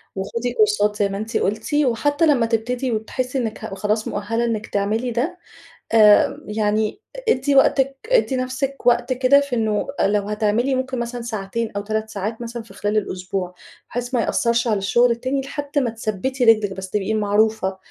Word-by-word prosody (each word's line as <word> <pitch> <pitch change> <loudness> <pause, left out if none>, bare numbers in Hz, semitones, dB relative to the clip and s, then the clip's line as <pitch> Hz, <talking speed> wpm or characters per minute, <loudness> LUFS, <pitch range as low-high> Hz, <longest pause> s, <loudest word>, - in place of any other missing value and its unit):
وخدي 230 +5 -3
كورسات 210 -2 +2
زي 205 -1 +1
ما 195 - -4
أنتِ 220 +2 -2
قلتِ 215 +8 -2
وحتى 290 +2 +2
لمّا 275 -7 +3
تبتدي 240 +3 -1
وتحسي 250 +4 -2
إنِك 230 -4 -3
ه 195 - -6
خلاص 215 +2 -1
مؤهلة 225 +3 -1
إنِك 220 -2 -2
تعملي 215 +5 -1
ده 275 +10 -2 0.5
آآ، 215 -2 +5
يعني 215 - 0 0.3
ادّي 275 -2 +2
وقتِك 270 0 +3
ادّي 455 - +3
نفسِك 260 +2 -3
وقت 245 +1 +3
كده 255 +2 +5
في 280 -3 -3
إنه 215 -2 0
لو 205 +1 +2
هتعملي 215 +5 +1
ممكن 260 -1 -2
مثلًا 240 +1 -4
ساعتين 225 0 -3
أو 205 - -1
3 215 +1 -3
ساعات 215 +2 -4
مثلًا 235 0 -6
في 225 - -16
خلال 205 +1 -1
الأسبوع، 185 -2 -3 0.4
بحيث 245 +1 -4
ما 240 - +2
يأثرش 235 +1 +1
على 215 -2 +2
الشغل 235 +5 +3
التاني، 255 +4 -1
لحد 285 +1 -3
ما 255 -4 0
تثبّتي 225 +4 -3
رجلِك 215 -3 +4
بس، 190 0 -7
تبقي 210 +1 -1
معروفة 210 -2 +1
230 Hz, 175 wpm, -21 LUFS, 210-255 Hz, 0.5 s, آآ